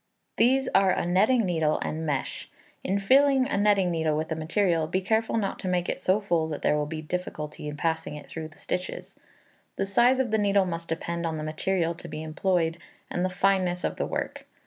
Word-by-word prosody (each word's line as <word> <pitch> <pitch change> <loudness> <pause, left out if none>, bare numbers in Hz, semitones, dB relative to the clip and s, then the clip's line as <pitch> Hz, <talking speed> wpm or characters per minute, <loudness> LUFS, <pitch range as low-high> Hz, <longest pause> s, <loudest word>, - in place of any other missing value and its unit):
These 265 +3 +3
are 195 0 +5
a - - -1
netting 210 +7 +3
needle 160 -4 +1
and 160 +1 -3
mesh. 140 -3 -3 0.3
In 195 +2 0
filling 265 +5 +4
a - - -1
netting 200 -3 +3
needle 160 -2 0
with 155 +1 -2
the 160 - -1
material, 165 0 +1
be 185 +3 0
careful 220 +4 0
not 200 -3 -2
to - - -4
make 180 -1 0
it - - -3
so 185 +3 +2
full 170 -6 0
that 155 -2 -5
there - - +3
will 150 0 -1
be 160 +1 -5
a - - -13
difficulty 150 -3 -5
in 150 0 -5
passing 160 0 -1
it 150 - -9
through 160 -1 -6
the 155 - -19
stitches. 180 0 -5 0.6
The 195 - -1
size 240 +6 +4
of 250 -4 0
the 220 - +2
needle 200 -1 +3
must 170 -2 -5
depend 170 +1 -2
on 160 -1 -3
the 155 - -4
material 165 +2 0
to 170 - -10
be 155 - -6
employed, 165 +1 0 0.3
and 175 - -1
the 185 - +1
fineness 185 -1 +1
of - - -2
the - - -1
work. - - -4
180 Hz, 220 wpm, -27 LUFS, 160-200 Hz, 0.6 s, are